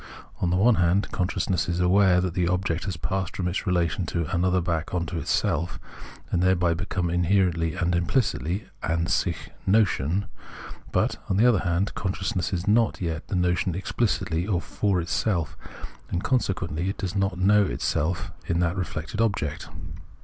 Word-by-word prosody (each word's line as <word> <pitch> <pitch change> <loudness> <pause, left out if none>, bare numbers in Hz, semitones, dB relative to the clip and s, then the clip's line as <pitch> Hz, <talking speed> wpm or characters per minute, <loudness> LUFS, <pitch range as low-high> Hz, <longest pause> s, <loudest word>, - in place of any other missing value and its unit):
On 90 - +1
the 90 - +2
one 110 +4 +4
hand, 90 +3 +2
consciousness 90 -1 0
is 85 0 -1
aware 90 0 +4
that 90 -2 -2
the 90 -1 +1
object 90 -1 0
has 95 -4 -3
passed 95 +2 -3
from 90 - -1
its 90 +4 -2
relation 90 -1 +1
to 85 -1 -1
an 85 - +1
other 95 0 +3
back 85 -1 -2
into 85 -1 -2
itself, 85 +2 0 0.5
and 85 - +1
thereby 90 -2 +3
become 90 +1 -2
inherentlj^ 90 -1 +1
and 90 0 +1
implicitly 85 - 0
{an 85 0 0
sich) 90 -2 -1 0.2
notion; 95 -3 +2 0.7
but, - - +1
on 95 - +1
the 110 - +5
other 120 -6 +5
hand, 90 +2 0
consciousness 95 -1 -2
is 90 0 -2
not 110 +1 +3
yet 80 -2 -3
the - - -3
notion 90 0 +1
explicitly 95 -4 -1
or 95 -5 +1
for 100 +1 0
itself, 85 -1 -1 0.5
and 90 - -2
consequently 95 -8 0
it 100 - -4
does 95 0 -3
not 95 -2 0
know 100 +3 +5
itself 85 +4 -1 0.2
in 85 -2 +1
that 85 0 +1
reflected 90 +1 -3
object. 100 -10 -1
90 Hz, 165 wpm, -25 LUFS, 85-95 Hz, 0.7 s, the